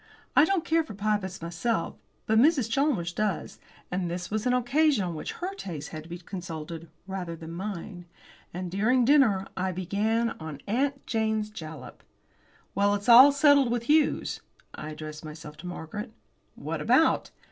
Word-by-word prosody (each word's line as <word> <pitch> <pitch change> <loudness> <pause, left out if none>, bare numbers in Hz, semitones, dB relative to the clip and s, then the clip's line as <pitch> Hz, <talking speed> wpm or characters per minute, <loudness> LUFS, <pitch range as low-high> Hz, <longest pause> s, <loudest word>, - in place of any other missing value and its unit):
I 295 - +7
don't 375 -2 0
care 325 0 +2
for 255 -10 -10
Pybus 200 -3 -2
myself, 170 +4 -2 0.3
but 220 0 +3
Mrs. 275 -2 +4
Chalmers 230 - +1
does, 210 -1 -2 0.3
and 180 -1 -1
this 175 +1 -5
was 215 +3 -1
an 250 - +3
occasion 270 0 +3
on 175 -2 -3
which 155 - -5
her 370 +2 -4
taste 165 - -6
had 155 - -7
to - - -14
be 175 - -5
consulted 170 -3 -7 0.2
rather 185 -3 -5
than 165 0 -9
mine. 180 0 -6 0.5
And 180 0 -5
during 235 +6 +3
dinner 240 -9 +4
I 185 0 -1
began 210 +6 0
on 160 -3 -7
"Aunt 275 +6 -1
Jane's 220 -1 -1
Jalap." 155 -9 -9 0.7
"Well, 200 +1 +2
it's 205 +3 -3
all 255 +4 +10
settled 280 -2 +5
with 235 -1 -1
Hughes." 300 +4 +2 0.3
I 155 - -7
addressed 155 0 -8
myself 155 -1 -9
to 180 - -9
Margaret. 180 +6 -6 0.4
"What - - -4
about?" - - +3
200 Hz, 165 wpm, -27 LUFS, 170-245 Hz, 0.7 s, all